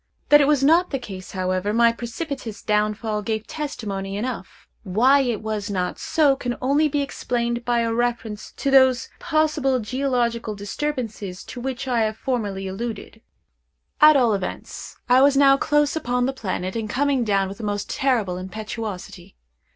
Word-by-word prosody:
That 295 0 +8
it 280 - +3
was 290 -2 +3
not 335 +5 +4
the 275 - -1
case, 195 -7 -9
however, 185 +2 -1
my 235 0 +5
precipitous 235 -1 -6
downfall 210 0 0
gave 220 +1 -3
testimony 200 -10 -5
enough; 230 -3 -6
why 235 +8 +4
it 240 -6 -1
was 215 -1 -3
not 185 -3 -2
so, 295 -4 +3
can 245 -2 -4
only 285 +4 +2
be 290 -1 0
explained 240 -3 -2
by 240 -1 +1
a 230 -1 0
reference 230 -3 -2
to 275 - -2
those 260 -3 +5
possible 305 -4 +1
geological 235 -2 -1
disturbances 210 -3 -4
to 245 - -8
which 265 0 -4
I 245 -2 +1
have 220 -1 0
formerly 205 -7 -2
alluded. 225 +2 -6 0.8
At 305 -1 +8
all 240 -4 +3
events 195 -2 -5
I 250 +1 +5
was 275 0 +5
now 275 -1 +6
close 295 +1 +1
upon 245 -5 0
the 270 - -1
planet, 190 -5 -4
and 220 -2 -3
coming 275 +1 +1
down 200 -3 +1
with 195 +3 -9
the - - -7
most 205 -1 -2
terrible 225 -9 0
impetuosity. 210 - -7
235 Hz, 165 wpm, -23 LUFS, 210-270 Hz, 0.8 s, That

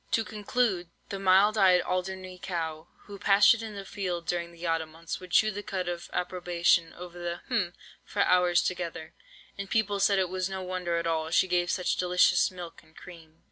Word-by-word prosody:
"To 225 - +3
conclude, 210 -4 -1 0.2
the 195 - -4
mild 195 +3 +4
eyed 185 -2 +5
Alderney 185 0 -4
cow, 160 -3 -4
who 200 -1 -11
pastured 205 +3 +5
in 220 -2 -7
the 200 -1 -7
field 180 -4 -4
during 170 -1 -2
the 170 +1 -9
autumn 165 -1 -1
months, 165 +1 -6
would 185 -1 -11
chew 215 +5 +4
the 205 0 -5
cud 190 -3 -4
of 175 -1 -5
approbation 175 -2 +1
over 175 0 -10
the—hm—for 180 +2 -3
hours 180 -1 +3
together, 170 -3 -4 0.5
and 200 0 -5
people 210 -3 +1
said 200 0 +3
it 190 -1 +2
was 185 0 -2
no 190 -1 -5
wonder 180 -2 -2
at 170 - -2
all 160 -1 0
that 160 - -2
she - - +4
gave 175 -1 +1
such 180 - 0
delicious 180 0 +3
milk 180 -2 -9
and 160 -1 -24
cream." 165 -2 -14
180 Hz, 190 wpm, -28 LUFS, 170-195 Hz, 0.5 s, eyed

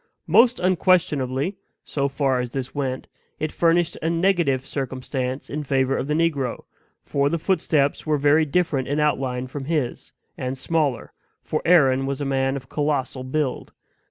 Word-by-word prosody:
Most 230 +8 +5
unquestionably, 180 -4 +1 0.3
so 140 -1 -1
far 135 -2 0
as 125 -1 -2
this 130 +1 -5
went, 130 -2 -3 0.3
it 155 0 -2
furnished 170 0 +2
a 160 - 0
negative 165 -6 +1
circumstance 130 -1 -4
in 150 +2 -4
favor 135 -1 +1
of 130 - -2
the 150 - 0
negro, 150 -7 0 0.4
for 140 0 +1
the 170 - 0
footsteps 155 -5 +1
were 155 -1 +1
very 145 +3 +4
different 145 -4 0
in 145 +2 -1
outline 130 -4 0
from 135 +1 -6
his, 150 -5 -2 0.3
and 130 +1 -3
smaller, 145 -3 -1 0.3
for 155 - -2
Aaron 135 -6 +4
was 140 -1 -2
a 145 - -2
man 135 0 0
of 130 -1 -7
colossal 140 -3 -1
build. 130 0 -2
140 Hz, 155 wpm, -23 LUFS, 130-160 Hz, 0.4 s, Most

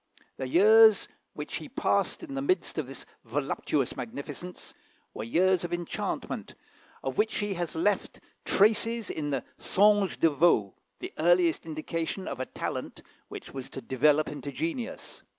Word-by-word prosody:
The 130 - -3
years 215 +7 +6 0.3
which - - -5
he - - -8
passed - - 0
in 295 -5 -7
the 270 - -2
midst 365 - 0
of 145 - -3
this 135 0 -9 0.2
voluptuous 135 +2 -1
magnificence 140 +8 -7 0.4
were - - -5
years 180 +9 +2
of 175 - -4
enchantment, 175 -1 -4 0.5
of 135 -1 -3
which 220 +1 +2
he 205 -1 -1
has 175 -3 -4
left 200 +5 0 0.2
traces 225 +2 +2
in 150 -2 -3
the 135 -4 -1 0.2
"Songe 205 -1 +3
de 165 - +4
Vaux," 140 - +3 0.3
the - - -6
earliest 170 0 +3
indication 165 +4 -3
of - - -5
a 130 - -3
talent - - -5 0.2
which - - -9
was 135 -2 -6
to - - -7
develop 145 +4 +2
into 145 -1 -6
genius. 295 - -5
170 Hz, 150 wpm, -28 LUFS, 140-205 Hz, 0.5 s, years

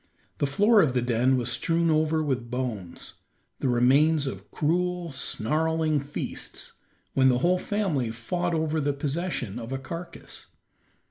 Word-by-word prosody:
The 145 - +2
floor 205 +10 +5
of 135 -7 +1
the 125 - +3
den 125 +2 +2
was 120 -1 0
strewn 165 +6 +1
over 155 0 +2
with 130 -5 -2
bones, 115 -8 -4 0.5
the - - 0
remains 140 +5 +4
of 135 - -6
cruel, 175 +2 0
snarling 155 +5 0
feasts, 140 +1 -5 0.4
when 130 -1 +5
the 125 - +3
whole 180 +1 +3
family 180 - -1
fought 170 +10 -2
over 160 0 0
the 145 0 +1
possession 140 - -3
of 115 +1 -7
a 135 - -1
carcass. 170 +6 -7
145 Hz, 145 wpm, -27 LUFS, 125-165 Hz, 0.5 s, floor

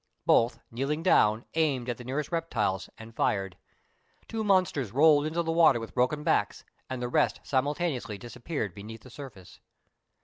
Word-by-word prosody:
Both, 115 0 +4
kneeling 140 +7 -2
down, 110 -10 +3
aimed 145 -7 +1
at 120 - -2
the - - -8
nearest 140 +6 -3
reptiles, 115 - -1
and 115 0 -12
fired. 95 -4 0 0.7
Two 225 -1 -3
monsters 185 - +2
rolled 150 +3 +5
into 170 +2 -1
the 165 - -1
water 165 -7 +5
with 115 - -8
broken 130 +4 +1
backs, - - 0 0.3
and 130 -1 -4
the - - -1
rest 120 - +1
simultaneously 135 - -1
disappeared 120 - -5
beneath 110 +3 -9
the 130 - -14
surface. 120 -10 -11
130 Hz, 160 wpm, -28 LUFS, 115-155 Hz, 0.7 s, rolled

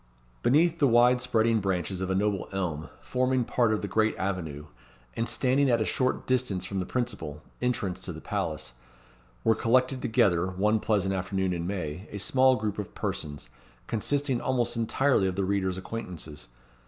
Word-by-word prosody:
Beneath 165 - +3
the 140 - +5
wide 125 +1 +5
spreading 115 -2 +2
branches 95 -1 -2
of 95 - -2
a 95 - +1
noble 100 0 0
elm, 85 -6 -3
forming 130 0 +1
part 120 -1 +2
of 110 - -1
the - - -1
great 110 +3 +1
avenue, 80 -7 -3 0.5
and 115 0 -1
standing 130 +3 +2
at 120 -2 +3
a 110 - +1
short 130 +3 0
distance 120 -8 0
from 95 0 -3
the 90 - -3
principal, 80 - -3 0.2
entrance 105 -7 -1
to 95 -1 -6
the 80 - -8
palace, 85 - -3 0.7
were 115 - +5
collected 130 +4 +2
together, 90 -5 +2
one 105 +4 +1
pleasant 100 -3 +1
afternoon 95 0 -1
in 85 0 -3
May, 90 -1 -4
a 105 - -5
small 130 +5 +4
group 105 -3 -3
of 105 - -6
persons, 75 -2 -4 0.3
consisting 135 +3 0
almost 125 -3 0
entirely 115 -1 +2
of 95 - -2
the 95 0 0
reader's 95 -1 0
acquaintances. 90 -7 -7
105 Hz, 170 wpm, -28 LUFS, 95-125 Hz, 0.7 s, the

